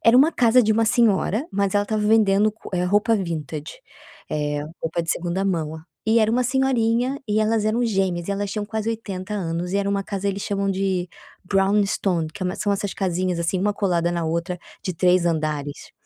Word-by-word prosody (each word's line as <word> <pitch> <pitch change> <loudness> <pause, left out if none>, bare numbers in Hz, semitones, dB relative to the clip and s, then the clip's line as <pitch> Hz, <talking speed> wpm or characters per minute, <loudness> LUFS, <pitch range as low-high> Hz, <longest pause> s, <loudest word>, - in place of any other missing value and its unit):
era 230 +2 +6
uma 300 +5 +6
casa 245 -1 +4
de 220 0 +3
uma 225 +1 +2
senhora, 225 - +2
mas 200 0 0
ela 205 - +4
estava 215 +1 -2
vendendo 210 -1 +4 0.4
roupa 210 +4 +3
vintage, 160 -6 -4 0.6
eh 145 -1 -1 0.2
roupa 165 +1 -1
de 165 - -3
segunda 175 +2 -1
mão, 160 -5 -1 0.3
e 225 +1 +4
era 220 0 +3
uma 250 +2 +2
senhorinha 255 0 +1
e 215 +1 +2
elas 215 0 +1
eram 235 +3 +1
gêmeas 190 -5 0
e - - +1
elas 200 0 -2
tinham 210 0 -3
quase 220 +1 -3
80 210 -3 -4
anos 175 -1 -3
e - - +3
era 200 0 0
uma 200 0 0
casa 200 0 -4
eles 200 0 -2
chamam 200 -1 -1
de 190 -2 -1 0.3
Brown 195 +2 +2
Stone 180 -4 0
que 185 - -7
é 180 0 -1
são 205 -1 0
essas 200 0 -2
casinhas 185 -2 -1
assim 170 +2 0
uma 205 +1 +1
colada 175 -4 +1
na 170 -1 -2
outra 170 +2 -2 0.2
de 185 - -3
3 180 +1 +3
andares. 150 -3 -2
195 Hz, 200 wpm, -23 LUFS, 175-215 Hz, 0.6 s, era